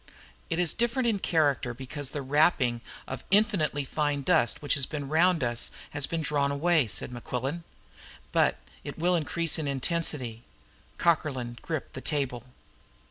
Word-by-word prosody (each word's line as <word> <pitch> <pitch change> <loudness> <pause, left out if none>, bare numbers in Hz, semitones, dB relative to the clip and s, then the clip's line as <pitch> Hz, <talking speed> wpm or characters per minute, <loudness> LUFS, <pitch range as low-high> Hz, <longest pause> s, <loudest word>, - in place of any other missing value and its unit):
"It 165 - 0
is 175 -3 +1
different 240 +2 +1
in 215 -4 +1
character 140 -9 +1
because 135 +2 -6
the 145 - -4
wrapping 135 -4 +3 0.3
of 130 -1 -6
infinitely 195 -9 +2
fine 145 0 -1
dust 155 -7 +3
which 145 - 0
has 140 -3 +1
been 145 -3 -4
round 165 +1 +3
us 120 -1 0 0.2
has 145 -1 -2
been 165 -1 -2
drawn 140 -1 +1
away," 155 -1 +3
said 100 - -3
Mequillen. 130 +6 -4 0.7
"But - - +3 0.3
it - - -7
will 175 +2 +2
increase 165 0 +1
in 155 - -2
intensity." 135 -4 -1 0.6
Cockerlyne 130 -8 0
gripped 155 -4 -4
the 130 - -6
table. 135 -6 -2
145 Hz, 150 wpm, -28 LUFS, 130-165 Hz, 0.7 s, wrapping